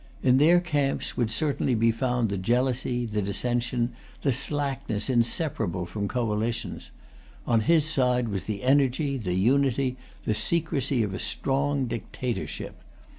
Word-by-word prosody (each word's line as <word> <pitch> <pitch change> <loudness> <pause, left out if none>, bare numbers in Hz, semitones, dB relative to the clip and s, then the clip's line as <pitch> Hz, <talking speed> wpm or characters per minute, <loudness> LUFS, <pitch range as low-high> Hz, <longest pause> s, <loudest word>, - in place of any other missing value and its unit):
In 130 0 +5
their 170 +4 +6
camps 145 -6 -1
would 120 -3 0
certainly 135 0 0
be 115 +1 +3
found 125 -1 0
the 100 - -2
jealousy, 120 +3 0
the 105 -2 -2
dissension, 120 +4 -1 0.3
the 140 - +3
slackness 135 -3 -1
inseparable 120 - 0
from 100 +3 -3
coalitions; 115 0 -2 0.6
on 115 -2 +3
his 155 +7 +3
side 125 -5 +2
was 100 -2 -3
the 105 -2 -4
energy, 135 +1 +2
the 90 -5 -2
unity, 130 +4 +2 0.3
the - - +1
secrecy 145 -3 0
of 100 -3 -3
a - - -4
strong 140 0 0
dictatorship. 120 +1 -4
125 Hz, 135 wpm, -26 LUFS, 115-140 Hz, 0.6 s, their